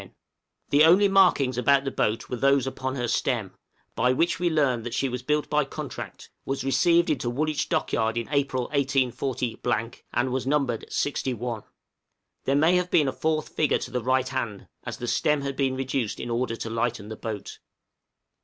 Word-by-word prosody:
The 145 +2 +6
only 180 +5 +6
markings 175 -10 +4
about 135 +2 +4
the 135 - -2
boat 110 +2 -1
were - - -3
those 135 +1 +3
upon 130 0 -3
her 120 -2 -2
stem, 115 -3 -1 0.4
by 125 - +2
which 165 +7 +1
we 175 -1 +2
learned 140 -7 +1
that 120 - -4
she 135 - +1
was 125 -1 -4
built 150 +3 0
by 150 0 +2
contract, 135 - -8
was 135 -1 -3
received 170 +5 +3
into 125 -5 -1
Woolwich 150 +5 -1
Dockyard 110 0 0
in 115 - -2
April, 140 -3 +1
184, 130 -4 -1 0.2
and 125 +2 +1
was 130 0 -2
numbered 135 -5 0
61. 125 -5 -2 0.8
There 135 - +2
may 160 +5 +4
have 180 0 -1
been 150 -5 +3
a 130 - -1
fourth 155 -1 -1
figure 150 - +1
to - - -7
the 125 - -1
right 130 +1 +1
hand, 120 -6 -4 0.2
as - - -5
the 120 - -5
stem 150 +4 +1
had 140 -1 -3
been 135 -1 0
reduced 130 -4 -2
in 120 - -4
order 115 0 -1
to 115 - -5
lighten 115 -2 -2
the 110 - -5
boat. 110 -2 -6
130 Hz, 180 wpm, -26 LUFS, 120-145 Hz, 0.8 s, The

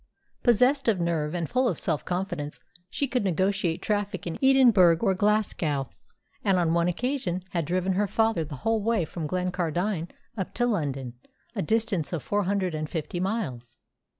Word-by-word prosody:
Possessed 250 +4 +3
of 215 -5 +3
nerve 165 -2 -1
and 170 -2 -1
full 255 +1 +1
of 180 - -1
self 150 - -1
confidence, 175 -5 -3 0.3
she 280 - -1
could 250 -3 0
negotiate 190 -2 0
traffic 205 -2 -1
in 170 - -4
Edinburgh 240 -11 +6
or 195 -4 +3
Glasgow, 185 - 0 0.5
and 195 -3 +3
on 170 -2 +2
one 170 0 +2
occasion 185 -2 -1
had 170 -3 -1
driven 185 +3 0
her 205 +2 +1
father 225 -4 +1
the 150 -1 -7
whole 225 -1 +2
way 220 -4 +1
from 160 0 -5
Glencardine 180 0 -1 0.3
up 190 -4 -4
to 240 - +2
London, 140 - -1 0.4
a - - -1
distance 210 -5 0
of 160 - -2
four 205 -1 0
hundred 190 -2 0
and 155 0 -3
fifty 165 +1 -3
miles. 175 - -3
185 Hz, 170 wpm, -27 LUFS, 165-215 Hz, 0.5 s, Edinburgh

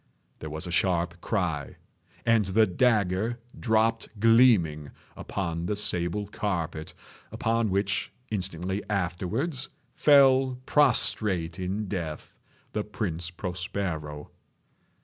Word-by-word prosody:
There 80 - -6
was 80 +1 -5
a 90 - -5
sharp 85 -1 +1
cry—and 100 +4 -2
the 105 +4 +4
dagger 105 0 +1 0.2
dropped 115 -1 +1
gleaming 105 - +4 0.3
upon 85 -3 -4
the 105 - -1
sable 95 0 +2
carpet, 85 -6 -4 0.4
upon 115 -1 0
which, 100 +1 -1 0.2
instantly 95 -1 -2
afterwards, 105 - -2 0.2
fell 135 -3 +5
prostrate 100 - +2
in 95 +3 -3
death 85 -6 -5 0.4
the 105 - -1
Prince 90 -6 -4
Prospero. 90 -4 -5
95 Hz, 95 wpm, -27 LUFS, 85-110 Hz, 0.4 s, fell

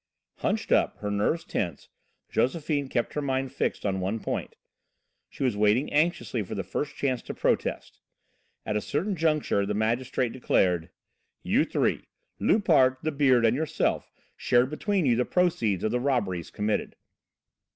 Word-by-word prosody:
Hunched - - -2
up, - - +3
her 105 - -4
nerves 105 +12 0
tense, 85 -7 -3 0.4
Josephine 145 +1 0
kept 120 -2 -1
her 150 - -1
mind 135 -2 -1
fixed - - -2
on 95 -1 0
one 95 +5 -2
point. - - -4 0.7
She - - -6
was 125 -5 +1
waiting 105 +7 +2
anxiously 150 -6 +1
for 95 - -5
the 95 - -2
first 140 +11 -4
chance 130 -3 -1
to - - -7
protest. - - -1 0.7
At 105 - -2
a 105 - +1
certain 185 - -1
juncture 155 - +1
the 105 +1 -2
magistrate 120 +3 0
declared: 90 -9 +1 0.5
"You - - +2
three, - - 0 0.3
Loupart, 150 -11 +4
'The 155 - 0
Beard' 130 -5 +3
and 115 +2 +3
yourself, 155 +1 -1 0.2
shared 125 +3 +2
between 190 +2 0
you 120 -3 +4
the 125 - +2
proceeds 160 - +1
of 110 - +1
the 125 - +1
robberies 105 - -1
committed." 105 +1 -2
125 Hz, 155 wpm, -27 LUFS, 105-150 Hz, 0.7 s, Loupart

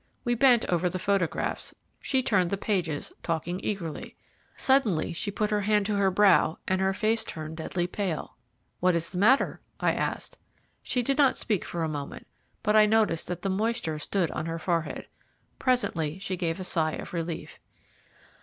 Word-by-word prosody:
We 240 -2 +1
bent 240 -1 +5
over 180 0 +1
the 185 - -3
photographs; 190 -2 -1 0.2
she 265 -2 0
turned 185 -7 +2
the 200 - -1
pages, 180 -8 -2
talking 170 +2 -2
eagerly. 170 -7 -4 0.4
Suddenly, 230 - +2
she 190 +5 -2
put 210 +1 -1
her 210 -1 +2
hand 210 0 +2
to 210 0 0
her 200 -1 +3
brow, 190 -4 +4
and 190 0 +1
her 190 0 +2
face 220 +3 +1
turned 155 -5 -6
deadly 175 +2 -2
pale. 180 -2 -3 0.4
"What 180 -1 +3
is 170 0 -1
the 180 - -3
matter?" 245 +8 +3 0.2
I - - +2
asked. - - -3 0.4
She 250 - -1
did 275 +4 0
not 275 -3 +4
speak 210 -5 0
for 170 -1 -3
a - - 0
moment, 145 -2 -6 0.4
but 210 0 +2
I 215 0 +7
noticed 210 -7 +2
that 180 -1 -5
the 195 - 0
moisture 195 -5 -1
stood 175 +3 -1
on 160 - -3
her 165 0 -3
forehead. 165 -1 -2 0.5
Presently 180 - 0
she 190 -1 -3
gave 165 -1 -2
a - - -4
sigh 160 -3 0
of - - -7
relief. 165 -1 -4
190 Hz, 180 wpm, -27 LUFS, 165-215 Hz, 0.5 s, I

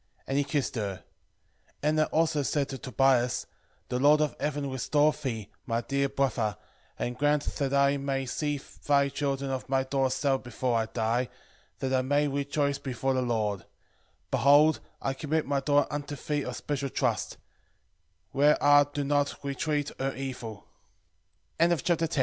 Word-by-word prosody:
And 135 - -2
he 145 - +3
kissed 145 -1 -1
her. 100 -4 -3 0.8
Edna 155 +1 +3
also 155 -2 +1
said 140 0 0
to 135 - -5
Tobias, 130 -2 +2 0.4
The 125 - -1
Lord 145 +3 +6
of 150 -1 0
heaven 145 -2 -2
restore 145 +3 +2
thee, 115 -8 -5 0.2
my 115 0 0
dear 140 +3 0
brother, 115 -7 0 0.4
and 120 - -3
grant 145 +1 +2
that 140 -2 -1
I 140 0 +3
may 135 -1 -2
see 145 +2 -2 0.3
thy 140 -1 +4
children 140 -1 -2
of 130 0 -4
my 135 -1 +2
daughter 135 0 +1
Sara 135 +1 +1
before 125 0 -2
I 110 -1 +1
die, 120 +2 0 0.5
that 130 0 -2
I 130 - +3
may 145 +3 +2
rejoice 140 0 -1
before 135 -1 -1
the 130 - +1
Lord: 110 -5 -1 0.7
behold, 145 +3 +5 0.2
I 135 - 0
commit 155 +3 -1
my 140 0 0
daughter 145 +1 +2
unto 145 0 -4
thee 145 +1 -2
of - - -4
special 140 -2 -3
trust; - - -1 0.9
where 145 +2 +4
are 145 0 +7
do 145 0 -2
not 145 0 +1
entreat 145 +1 -1
140 Hz, 150 wpm, -28 LUFS, 130-145 Hz, 0.9 s, are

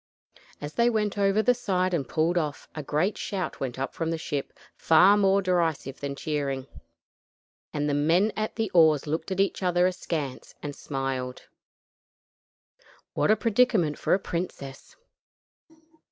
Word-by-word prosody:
As 145 +1 -6
they 235 0 +3
went 215 -3 0
over 200 +1 +2
the 250 - +4
side 185 -6 -1
and 140 -7 -1
pulled 160 +3 +1
off, 150 -4 -2
a 155 - -5
great 155 +8 -1
shout 190 -3 -4
went 130 -2 -4
up 135 - -3
from 165 -1 -2
the 165 - -1
ship 145 -3 -4 0.2
far 180 +5 +5
more 195 -1 +3
derisive 165 -7 0
than 140 -1 -4
cheering, 140 -3 -2 1.1
and 145 -1 -1
the 145 - 0
men 165 +9 +3
at 215 0 -3
the 220 -4 -2
oars 160 -4 +5
looked 155 +2 -3
at 190 0 -3
each 195 0 +1
other 180 -1 +2
askance 160 -7 -3
and 145 -1 -5
smiled. 135 -2 -4 1.7
What - - +1
a 215 - +6
predicament 215 -8 +2
for - - +2
a - - -1
princess! 170 -7 -6
170 Hz, 155 wpm, -26 LUFS, 145-195 Hz, 1.7 s, a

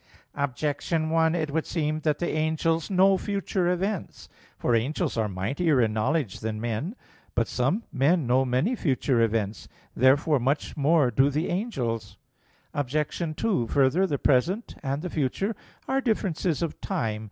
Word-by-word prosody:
Objection 145 +3 -1
1: 165 0 +3
It 155 -4 -1
would 160 +2 -1
seem 155 -2 -1
that 150 -1 0
the 175 - -2
angels 160 +1 0
know 190 0 +4
future 195 -3 -1
events. 190 +2 -3 0.3
For 120 - 0
angels 140 +8 0
are 110 -2 +1
mightier 135 - 0
in 110 -3 +2
knowledge 110 - 0
than 110 -1 -3
men. 120 - -3 0.4
But 115 -1 +1
some 135 - 0
men 145 +4 +2
know 125 +2 +3
many 135 - +1
future 130 - +1
events. 110 -2 -1 0.3
Therefore 140 +3 +4
much 135 +5 -1
more 145 -3 +3
do 135 +3 +4
the 150 +5 -1
angels. 115 - -3 0.6
Obj. 150 +3 -2
2: 190 - 0
Further, 145 +10 +3
the 145 - -1
present 170 - +1
and 140 +1 -2
the 180 - -3
future 165 - -1 0.3
are 270 +1 +1
differences 185 - 0
of 165 - -4
time. 110 -2 -2
150 Hz, 150 wpm, -26 LUFS, 125-170 Hz, 0.6 s, know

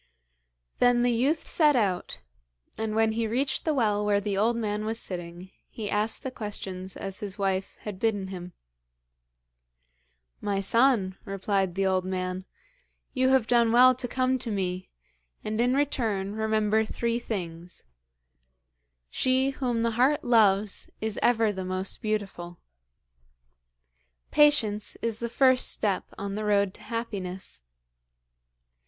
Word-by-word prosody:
Then 245 -1 +4
the 245 - +3
youth 270 +7 +1
set 300 -3 +3
out, 190 - 0 0.5
and 220 -1 -3
when 225 0 +3
he 225 0 -1
reached 265 +4 -1
the 315 - +2
well 210 -5 +1
where 205 -1 +2
the 200 -1 -2
old 220 +4 +2
man 210 -2 -2
was 225 +1 -1
sitting 175 0 -6 0.2
he 210 -3 -5
asked 210 +5 -1
the 265 - -4
questions 190 -5 -6
as 195 -1 -5
his 200 -2 -6
wife 195 -1 -1
had 205 -3 -7
bidden 205 -4 0
him. 180 -2 -8 1.9
'My 200 -1 -1
son,' 200 -2 +2
replied 195 -2 -1
the 195 0 +1
old 185 -1 +2
man, 185 0 -3 0.7
'you 260 0 +2
have 265 -3 +4
done 235 -1 +3
well 250 +2 +7
to 255 0 -4
come 255 +1 0
to 240 - -4
me, 185 -3 -3 0.5
and 215 +2 -1
in 250 +2 +2
return 225 -9 0
remember 220 0 +1
three 235 +2 -2
things: 175 -6 -6 1.3
"She 260 +1 +2
whom 245 -4 -1
the 230 - +1
heart 265 +7 +2
loves, 210 -4 +3
is 220 -1 -3
ever 225 -3 +3
the 190 -1 -4
most 185 +1 -3
beautiful." 195 -5 -3 1.7
"Patience 230 -9 +3
is 225 -1 -1
the 235 - -3
first 255 +1 +4
step 200 -3 0
on 200 0 -4
the 215 +1 -3
road 200 -2 +2
to - - -11
happiness." 195 - -5
215 Hz, 140 wpm, -27 LUFS, 195-240 Hz, 1.9 s, well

